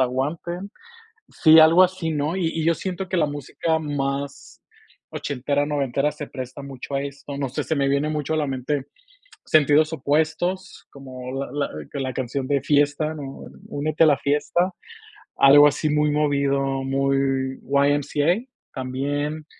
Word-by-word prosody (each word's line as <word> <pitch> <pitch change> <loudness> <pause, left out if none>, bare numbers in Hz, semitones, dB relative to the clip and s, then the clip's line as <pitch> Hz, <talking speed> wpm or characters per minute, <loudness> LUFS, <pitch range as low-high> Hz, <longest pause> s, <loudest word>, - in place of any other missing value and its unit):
aguanten. 155 +9 -2 0.6
Sí, 160 0 +6
algo 165 +3 +7
así, 185 -3 0
¿no? 150 +2 -1
Y 180 -3 0
y 165 -1 -3
yo 165 0 +3
siento 185 +1 -5
que 185 - -1
la 155 - +3
música 145 +3 -2
más 140 -2 -4 0.5
ochentera, 145 +1 -2
noventera, 140 -1 0
se 150 -1 -8
presta 130 +1 -7
mucho 140 0 -8
a 135 - 0
esto, 140 0 -7
no 140 -1 -2
sé, 125 - -4
se 160 - -1
me 140 -1 +1
viene 140 +2 +1
mucho 150 0 -2
a - - 0
la 150 - 0
mente 135 +1 -3 0.6
Sentidos 155 +1 +4
Opuestos, 160 +6 -1
como 130 -2 -9
la 135 +1 -4
la 145 -1 -2 0.3
la 130 -1 -3
canción 130 +1 -3
de 140 -2 +1
fiesta, 145 +2 +1
¿no? 135 -2 -8 0.2
"Únete 155 +2 0
a 160 - +6
la 145 - +4
fiesta", 150 +7 0 0.7
algo 145 +2 +8
así 150 +1 0
muy 150 0 +2
movido, 140 -2 0
muy 135 0 0
"Y.M.C.A.", 145 - +1 0.3
también. 145 +4 -3
145 Hz, 155 wpm, -23 LUFS, 135-155 Hz, 0.7 s, algo